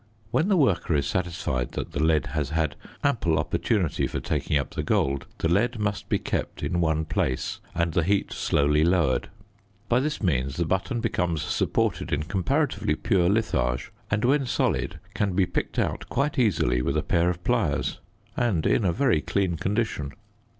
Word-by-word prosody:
When 160 Hz, -, +2 dB
the 200 Hz, -3 st, +3 dB
worker 100 Hz, -, +2 dB
is 70 Hz, -2 st, +1 dB
satisfied 85 Hz, -7 st, -2 dB
that -, -, -4 dB
the 70 Hz, -, -2 dB
lead 80 Hz, -2 st, +3 dB
has 75 Hz, -3 st, -1 dB
had 80 Hz, -2 st, 0 dB, 0.3 s
ample 115 Hz, -, +2 dB
opportunity 95 Hz, -10 st, 0 dB
for -, -, -3 dB
taking 75 Hz, -, 0 dB
up 70 Hz, -, -2 dB
the -, -, -3 dB
gold, 70 Hz, 0 st, 0 dB
the -, -, 0 dB
lead 115 Hz, +8 st, +2 dB
must 105 Hz, -1 st, -2 dB
be -, -, +3 dB
kept -, -, -3 dB
in 85 Hz, 0 st, 0 dB
one 80 Hz, -1 st, +1 dB
place 65 Hz, -4 st, -1 dB, 0.2 s
and 85 Hz, -1 st, 0 dB
the 85 Hz, -, +3 dB
heat 100 Hz, +4 st, 0 dB
slowly 75 Hz, +2 st, +2 dB
lowered. 85 Hz, -6 st, +2 dB, 0.6 s
By 120 Hz, -, +4 dB
this 150 Hz, +3 st, -1 dB
means 70 Hz, -6 st, 0 dB
the 85 Hz, -, 0 dB
button 95 Hz, +8 st, -1 dB
becomes 85 Hz, -8 st, 0 dB
supported -, -, 0 dB
in 75 Hz, +1 st, 0 dB
comparatively 95 Hz, -, 0 dB
pure 90 Hz, -1 st, +2 dB
litharge 60 Hz, -, 0 dB, 0.2 s
and 105 Hz, +3 st, +1 dB
when 135 Hz, +1 st, +2 dB
solid 80 Hz, -8 st, 0 dB
can 105 Hz, -2 st, 0 dB
be 95 Hz, 0 st, +3 dB
picked 90 Hz, -, -3 dB
out -, -, -1 dB
quite 140 Hz, 0 st, 0 dB
easily 75 Hz, -, +2 dB
with -, -, 0 dB
a -, -, 0 dB
pair 85 Hz, +1 st, +2 dB
of 90 Hz, 0 st, -4 dB
pliers -, -, 0 dB, 0.4 s
and 110 Hz, -10 st, +1 dB
in 115 Hz, -, +3 dB
a 90 Hz, -, +3 dB
very 105 Hz, -, +2 dB
clean 90 Hz, +2 st, 0 dB
condition. 95 Hz, -5 st, -2 dB
85 Hz, 180 wpm, -26 LUFS, 75-105 Hz, 0.6 s, By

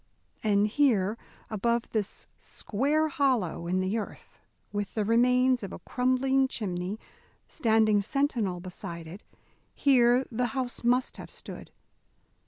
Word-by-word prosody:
And 205 Hz, -1 st, +3 dB
here, 215 Hz, -4 st, +2 dB, 0.4 s
above 235 Hz, +2 st, 0 dB
this 210 Hz, -3 st, -3 dB
square 290 Hz, +8 st, -1 dB
hollow 255 Hz, -, 0 dB
in 185 Hz, +2 st, +1 dB
the 195 Hz, +5 st, 0 dB
earth, 210 Hz, -, -9 dB, 0.3 s
with 205 Hz, -1 st, -3 dB
the 215 Hz, -2 st, 0 dB
remains 250 Hz, +3 st, +3 dB
of 200 Hz, -2 st, -6 dB
a -, -, -6 dB
crumbling 265 Hz, +1 st, +1 dB
chimney 190 Hz, -3 st, -3 dB, 0.5 s
standing 220 Hz, -6 st, +3 dB
sentinel 225 Hz, -6 st, 0 dB
beside 170 Hz, -2 st, -7 dB
it, 180 Hz, +6 st, -10 dB, 0.5 s
here 250 Hz, -2 st, +4 dB
the 245 Hz, +2 st, 0 dB
house 250 Hz, -2 st, -3 dB
must 250 Hz, +2 st, +1 dB
have -, -, -9 dB
stood. -, -, -9 dB
230 Hz, 125 wpm, -28 LUFS, 200-255 Hz, 0.5 s, here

